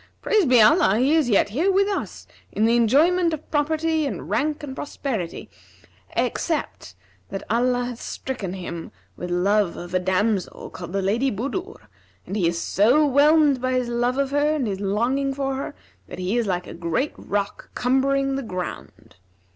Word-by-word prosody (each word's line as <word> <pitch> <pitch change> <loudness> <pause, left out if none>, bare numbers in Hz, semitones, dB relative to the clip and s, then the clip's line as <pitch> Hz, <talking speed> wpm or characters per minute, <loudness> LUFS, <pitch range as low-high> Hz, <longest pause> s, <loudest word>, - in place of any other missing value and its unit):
Praised 415 - +3
be 250 -2 +6
Allah, 225 - +5
he 265 +5 +3
is 310 -6 +3
yet 205 -2 +3
here 320 - +1
with 395 +1 +3
us 405 - -4 0.3
in 215 - +1
the 230 +1 +3
enjoyment 320 +9 +3
of 310 - -17
property 315 +1 +1
and - - -6
rank 300 +1 0
and 265 -2 -6
prosperity, 240 - -4 0.7
except 320 -3 -2 0.3
that 195 0 -5
Allah 245 +1 +1
hath 245 -1 -6
stricken 215 -9 -5
him 170 -3 -6 0.2
with 180 - -6
love 195 +1 +1
of 175 0 -8
a 185 - +3
damsel 190 +2 -1
called 175 -1 -8
the 195 -1 0
Lady 230 +8 +1
Budur;, 315 - -4 0.5
and 195 - -5
he 185 -5 +2
is 170 0 -1
so 240 - +3
whelmed 290 -1 +4
by 255 0 0
his 250 -1 0
love 240 +2 0
of 275 -1 0
her 290 +2 +2
and 280 -5 -1
his 195 -3 -3
longing 245 +8 0
for 270 -1 -1
her, 270 - -5 0.3
that - - -9
he 185 +4 -2
is 235 -3 +1
like 180 -2 -1
a - - -9
great 170 - -2
rock 200 0 -4
cumbering 270 +2 +1
the - - -2
ground. 185 -7 -7
250 Hz, 180 wpm, -23 LUFS, 200-290 Hz, 0.7 s, be